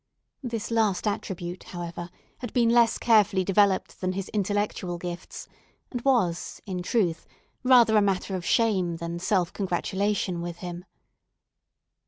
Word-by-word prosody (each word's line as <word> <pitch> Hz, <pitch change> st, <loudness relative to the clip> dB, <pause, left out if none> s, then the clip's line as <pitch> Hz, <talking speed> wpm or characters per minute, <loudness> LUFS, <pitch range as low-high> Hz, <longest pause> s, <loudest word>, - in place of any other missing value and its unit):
This 230 Hz, -4 st, -4 dB
last 220 Hz, -5 st, +1 dB
attribute, 185 Hz, -3 st, -4 dB
however, 175 Hz, 0 st, -6 dB, 0.3 s
had 245 Hz, -, -6 dB
been 235 Hz, -2 st, +3 dB
less 235 Hz, -1 st, +4 dB
carefully 210 Hz, -4 st, +4 dB
developed 195 Hz, 0 st, +2 dB
than 185 Hz, 0 st, 0 dB
his 195 Hz, 0 st, -4 dB
intellectual 205 Hz, -3 st, -1 dB
gifts, 175 Hz, +1 st, -7 dB, 0.4 s
and 245 Hz, -, -3 dB
was, 230 Hz, -11 st, +1 dB
in 185 Hz, -2 st, -4 dB
truth, 175 Hz, -4 st, 0 dB, 0.4 s
rather 245 Hz, -4 st, +6 dB
a 210 Hz, -, +6 dB
matter 195 Hz, -1 st, 0 dB
of 180 Hz, -, -4 dB
shame 190 Hz, -6 st, +2 dB
than 170 Hz, +1 st, -5 dB
self 185 Hz, -1 st, 0 dB
congratulation 190 Hz, -1 st, -1 dB
with 170 Hz, 0 st, -5 dB
him. 175 Hz, 0 st, -7 dB
195 Hz, 135 wpm, -26 LUFS, 175-220 Hz, 0.4 s, rather